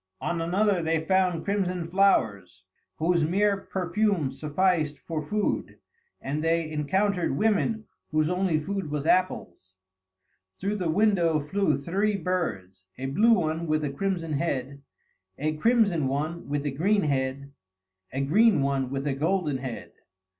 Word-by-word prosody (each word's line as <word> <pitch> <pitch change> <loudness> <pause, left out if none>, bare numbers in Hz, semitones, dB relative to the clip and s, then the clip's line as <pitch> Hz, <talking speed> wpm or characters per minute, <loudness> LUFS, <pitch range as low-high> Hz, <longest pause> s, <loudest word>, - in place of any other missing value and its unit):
On 170 -1 -2
another 190 +2 +1
they 160 -1 0
found 185 -3 +1
crimson 185 -4 -1
flowers, 100 - +1 0.3
whose 170 +1 +1
mere 200 +5 +2
perfume 190 -4 -1
sufficed 155 +1 0
for 160 -2 -4
food, 205 +8 -2 0.4
and 150 +3 -3
they 165 -1 +1
encountered 175 +1 0
women 220 +2 +1 0.2
whose 155 0 +1
only 180 -2 +1
food 190 +1 -4
was 145 -1 -3
apples. 95 - 0 0.8
Through 200 +2 -2
the 180 -4 -2
window 175 -4 +3
flew 155 +3 0
three 195 +8 0
birds: 100 - -3
a 130 - -5
blue 210 +13 +4
one 165 -4 0
with 155 0 +1
a 145 - -1
crimson 165 0 -2
head; 140 -3 -2 0.6
a 155 +2 -1
crimson 200 - +2
one 155 +5 -3
with 145 0 -2
a 145 - 0
green 195 +9 +1
head; 140 -1 -2 0.6
a 135 +3 -2
green 195 +3 +4
one 135 -2 0
with 135 +1 -3
a 145 - 0
golden 155 -1 0
head. 130 -3 -6
165 Hz, 140 wpm, -26 LUFS, 140-190 Hz, 0.8 s, blue